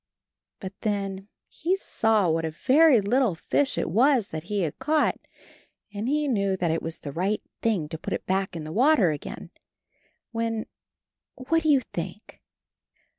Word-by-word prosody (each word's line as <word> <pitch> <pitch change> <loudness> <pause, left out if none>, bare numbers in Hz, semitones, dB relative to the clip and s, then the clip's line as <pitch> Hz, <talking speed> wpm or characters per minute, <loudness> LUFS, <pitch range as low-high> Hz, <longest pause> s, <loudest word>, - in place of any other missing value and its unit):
But 190 -1 -7
then 195 -2 -2 0.2
he 355 +4 -1
saw 220 - +1
what 165 0 +1
a 160 - -1
very 265 - +4
little 230 -1 +2
fish 275 +11 0
it - - 0
was 240 - +3
that 155 +1 -6
he 205 +1 -1
had 160 -5 -3
caught, 300 +3 +1 0.7
and 210 +4 -3
he 300 +1 +1
knew 200 -6 +1
that 175 -3 0
it 165 - -1
was 165 0 -5
the 145 - -7
right 190 +8 -1 0.2
thing 205 -9 0
to 160 - -6
put - - -4
it - - -4
back 190 -1 -1
in 160 - -5
the 155 +1 -7
water 245 - +4
again 150 - -7 0.4
— - - -42
^when 225 -1 -1 0.4
— - - -65
what 330 0 +3
do 315 - 0
you 280 -3 +5
think? 175 +5 -7
205 Hz, 175 wpm, -26 LUFS, 175-260 Hz, 0.7 s, you